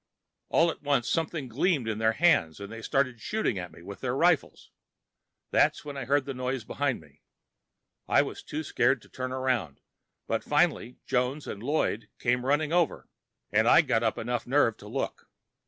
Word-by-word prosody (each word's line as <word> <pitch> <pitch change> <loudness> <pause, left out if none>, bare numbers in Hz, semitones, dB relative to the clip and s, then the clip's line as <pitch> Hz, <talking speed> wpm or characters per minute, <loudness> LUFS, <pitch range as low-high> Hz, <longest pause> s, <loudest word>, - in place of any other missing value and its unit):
All 165 0 +4
at - - -12
once, 140 -4 +1
something 160 -4 -1
gleamed 140 +1 +1
in 110 -1 -2
their 110 0 +3
hands, 140 - +3
and 100 +1 -8
they 115 0 -7
started 130 -2 0
shooting 215 - -1
at 90 -2 -6
me 80 - -15
with 100 +2 -9
their 125 -1 -1
rifles. 165 +1 +1 0.8
That's - - +2
when 145 -1 -6
I 135 -2 -4
heard 140 +1 +2
the 135 - -4
noise 130 -1 -3
behind 140 +2 -1
me. 75 -3 -20 0.9
I - - +4
was - - -7
too 155 +1 -5
scared 130 -2 +1
to - - -19
turn 130 0 -5
around, 130 - -1 0.5
but - - -1
finally 125 - +1
Jones 130 +3 0
and 100 - -6
Lloyd 115 -5 -1
came 125 +1 0
running 150 +3 +1
over, 175 -3 +1 0.4
and - - +3
I - - +8
got 115 - +1
up 115 -1 0
enough 120 +1 -3
nerve 125 -4 +3
to - - -12
look. - - -4
130 Hz, 185 wpm, -28 LUFS, 115-145 Hz, 0.9 s, I